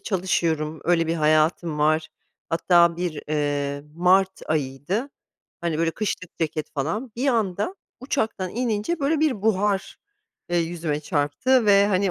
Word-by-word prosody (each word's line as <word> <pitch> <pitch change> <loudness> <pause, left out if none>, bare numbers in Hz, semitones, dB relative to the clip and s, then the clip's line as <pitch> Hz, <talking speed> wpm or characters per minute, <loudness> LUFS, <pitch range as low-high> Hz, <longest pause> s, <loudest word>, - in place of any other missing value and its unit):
çalışıyorum, 165 - -1
öyle 165 -1 +2
bir 165 - 0
hayatım 155 0 +2
var, 155 +1 +2 0.4
hatta 170 0 +4
bir, 175 -4 -3
eee, 145 -1 -1
Mart 185 +3 +3
ayıydı, 155 - -2 0.5
hani, 170 -2 -1
böyle 165 0 +2
kışlık 185 -2 -4
ceket 155 -2 -2
falan, 200 - -3
bir 265 +4 0
anda 215 - 0 0.3
uçaktan 220 -8 -2
inince 235 - -1
böyle 295 +2 +1
bir 270 -10 +1
buhar, 205 -2 0 0.5
eee, 175 - 0
yüzüme 165 -3 -2
çarptı 155 - +1
ve, 200 0 +6
hani, 195 -1 +1
175 Hz, 135 wpm, -24 LUFS, 155-210 Hz, 0.5 s, ve